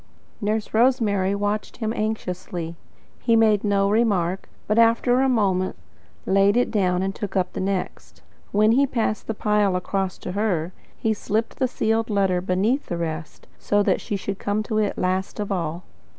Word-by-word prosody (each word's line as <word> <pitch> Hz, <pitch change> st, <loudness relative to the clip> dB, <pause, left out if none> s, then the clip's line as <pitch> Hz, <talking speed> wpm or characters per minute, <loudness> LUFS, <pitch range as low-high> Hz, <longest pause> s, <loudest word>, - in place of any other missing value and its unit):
Nurse 215 Hz, +1 st, -1 dB
Rosemary 220 Hz, -5 st, +2 dB
watched 205 Hz, +1 st, -2 dB
him 220 Hz, -1 st, -2 dB
anxiously. 180 Hz, -6 st, -3 dB, 0.4 s
He 230 Hz, -2 st, +2 dB
made 215 Hz, -3 st, +4 dB
no 200 Hz, -1 st, +2 dB
remark, 200 Hz, -4 st, +1 dB, 0.2 s
but 215 Hz, +2 st, +2 dB
after 230 Hz, +2 st, +4 dB
a 270 Hz, -, +3 dB
moment 190 Hz, -6 st, +1 dB, 0.5 s
laid 195 Hz, +3 st, +3 dB
it 245 Hz, -, +2 dB
down 185 Hz, -4 st, +1 dB
and 195 Hz, 0 st, -1 dB
took 205 Hz, -3 st, -6 dB
up 185 Hz, -1 st, 0 dB
the -, -, -4 dB
next. 190 Hz, -1 st, -4 dB, 0.3 s
But -, -, -3 dB
when 215 Hz, +1 st, +5 dB
he 275 Hz, +4 st, +4 dB
passed 225 Hz, -4 st, -1 dB
the 225 Hz, -, -2 dB
pile 210 Hz, -3 st, +2 dB
across 190 Hz, +1 st, -2 dB
to -, -, -6 dB
her, 185 Hz, -4 st, -1 dB, 0.2 s
he 220 Hz, -, 0 dB
slipped 220 Hz, +2 st, -2 dB
the 260 Hz, -, +2 dB
sealed 225 Hz, -2 st, 0 dB
letter 195 Hz, -3 st, +1 dB
beneath 200 Hz, +10 st, 0 dB
the 175 Hz, -, -3 dB
rest, 160 Hz, -2 st, -5 dB
so 205 Hz, 0 st, +2 dB
that -, -, +1 dB
she 205 Hz, -, -3 dB
should 195 Hz, 0 st, -4 dB
come 205 Hz, +1 st, -1 dB
to 215 Hz, 0 st, -1 dB
it 210 Hz, -2 st, 0 dB
last 185 Hz, +3 st, -1 dB
of 205 Hz, -1 st, -3 dB
all. 170 Hz, -2 st, -2 dB
205 Hz, 180 wpm, -23 LUFS, 185-220 Hz, 0.5 s, when